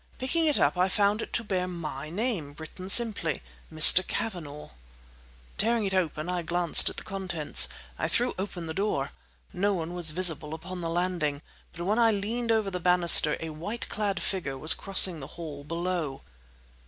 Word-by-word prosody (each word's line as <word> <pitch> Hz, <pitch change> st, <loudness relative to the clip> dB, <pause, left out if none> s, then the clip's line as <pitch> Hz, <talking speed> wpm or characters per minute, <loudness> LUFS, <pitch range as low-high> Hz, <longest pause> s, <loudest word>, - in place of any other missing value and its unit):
Picking 320 Hz, +6 st, -1 dB
it 300 Hz, -, +2 dB
up, 180 Hz, -, +1 dB
I 185 Hz, -, +3 dB
found 205 Hz, +3 st, +1 dB
it -, -, -8 dB
to 235 Hz, -, -2 dB
bear 185 Hz, -4 st, -2 dB
my 155 Hz, -5 st, -7 dB
name—written 175 Hz, -, -5 dB
simply— 210 Hz, -8 st, +3 dB, 0.3 s
"Mr. 155 Hz, +3 st, +7 dB
Cavanagh." 155 Hz, -, -6 dB, 0.9 s
Tearing 225 Hz, +1 st, 0 dB
it 190 Hz, -, -2 dB
open 165 Hz, -4 st, -2 dB
I 180 Hz, -1 st, -2 dB
glanced 170 Hz, 0 st, +2 dB
at -, -, -12 dB
the -, -, -7 dB
contents. 170 Hz, -, +1 dB, 0.3 s
I -, -, -1 dB
threw 245 Hz, +1 st, 0 dB
open 185 Hz, -3 st, -6 dB
the 160 Hz, -, -6 dB
door. 190 Hz, -8 st, -2 dB, 0.4 s
No 200 Hz, +2 st, 0 dB
one 170 Hz, 0 st, -5 dB
was 175 Hz, -3 st, 0 dB
visible 160 Hz, -2 st, +2 dB
upon 180 Hz, +3 st, -8 dB
the 165 Hz, -, -4 dB
landing, 165 Hz, -4 st, -2 dB, 0.3 s
but 170 Hz, -, -8 dB
when 210 Hz, +5 st, 0 dB
I 230 Hz, -1 st, +4 dB
leaned 225 Hz, +3 st, -2 dB
over 215 Hz, -3 st, 0 dB
the 180 Hz, -, -4 dB
banister 175 Hz, -3 st, +5 dB
a 165 Hz, -1 st, -6 dB
white 190 Hz, +10 st, -7 dB
clad 205 Hz, -3 st, -3 dB
figure 160 Hz, -9 st, -3 dB
was 155 Hz, +4 st, +6 dB
crossing 190 Hz, -3 st, +4 dB
the 135 Hz, -, -9 dB
hall, 150 Hz, -4 st, -8 dB
below. 165 Hz, -3 st, -4 dB
180 Hz, 175 wpm, -26 LUFS, 160-200 Hz, 0.9 s, Mr